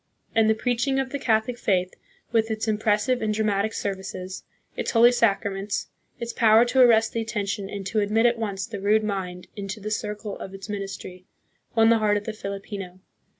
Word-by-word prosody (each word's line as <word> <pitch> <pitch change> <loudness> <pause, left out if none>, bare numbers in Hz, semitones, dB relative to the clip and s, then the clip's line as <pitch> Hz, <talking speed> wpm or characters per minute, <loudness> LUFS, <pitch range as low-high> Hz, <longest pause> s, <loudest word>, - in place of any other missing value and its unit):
And 220 -1 +4
the 220 - +4
preaching 250 +4 0
of 265 -1 -2
the 285 - -3
Catholic 235 0 +1
faith, 185 -2 +1 0.4
with 225 -1 +2
its 220 0 -2
impressive 215 +3 +1
and 215 -1 0
dramatic 210 0 +1
services, 190 -2 -5 0.3
its - - -2
holy 235 +1 +6
sacraments, 200 -3 0 0.3
its 235 0 -4
power 225 0 +5
to 250 +2 +1
arrest 225 -3 +5
the 230 - -1
attention 205 -3 -3
and 200 -1 -6
to 215 +3 0
admit 210 +3 +2
at 235 -1 +3
once 195 -4 -2
the 205 -4 -7
rude 215 +2 +3
mind 185 -4 -3
into 200 +1 -5
the 210 +1 -5
circle 210 -1 -4
of 195 - -7
its 195 +1 -9
ministry, 195 -3 -6 0.5
won 225 -1 +5
the 230 -1 +5
heart 210 -1 +2
of 205 - -4
the 220 - -4
Filipino. 195 -3 -6
215 Hz, 190 wpm, -25 LUFS, 195-225 Hz, 0.5 s, holy